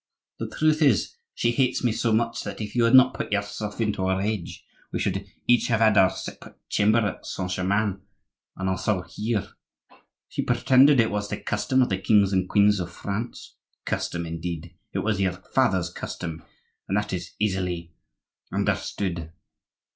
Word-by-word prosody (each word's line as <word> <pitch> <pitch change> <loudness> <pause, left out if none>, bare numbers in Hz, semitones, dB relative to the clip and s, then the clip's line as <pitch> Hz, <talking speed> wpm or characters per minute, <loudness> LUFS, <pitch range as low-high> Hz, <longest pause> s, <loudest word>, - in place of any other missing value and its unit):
The - - -4
truth 155 0 +1
is, 135 - +3 0.2
she 120 - +1
hates 125 +1 +1
me 120 - +3
so 115 +1 0
much 115 +1 +1
that - - -6
if 105 0 -5
you 120 -1 +4
had 115 +3 +5
not 130 0 +7
put - - -5
yourself 105 +1 -3
into 105 -4 0
a 95 - +2
rage, 100 -2 -3 0.3
we - - -2
should 95 0 -2 0.2
each 120 0 +4
have 115 -3 +2
had 110 -2 +5
our 95 -2 +6
separate - - -9
chamber 110 +3 +3
at 110 -3 -1
Saint 90 -1 -4
Germain, 100 +2 0 0.6
and 95 - -2
also 95 0 0
here. 105 +4 -3 0.8
She - - -3
pretended 130 +3 +5
it 115 - +3
was 105 0 -2
the - - -3
custom 130 +5 +1
of - - -1
the 95 - -1
kings 100 -1 +3
and 95 -1 +1
queens 105 -1 +4
of 85 -1 -4
France. 105 +7 -6 0.3
Custom, 85 0 -2
indeed! 85 0 -5 0.2
it - - -2
was 105 -2 0
your 95 -2 +1
father's 95 -4 0
custom, 80 -2 -6 0.5
and 95 - 0
that 105 -1 -2
is 90 - -5
easily 90 -5 -1 0.6
understood. 85 -5 -2
105 Hz, 170 wpm, -25 LUFS, 95-115 Hz, 0.8 s, not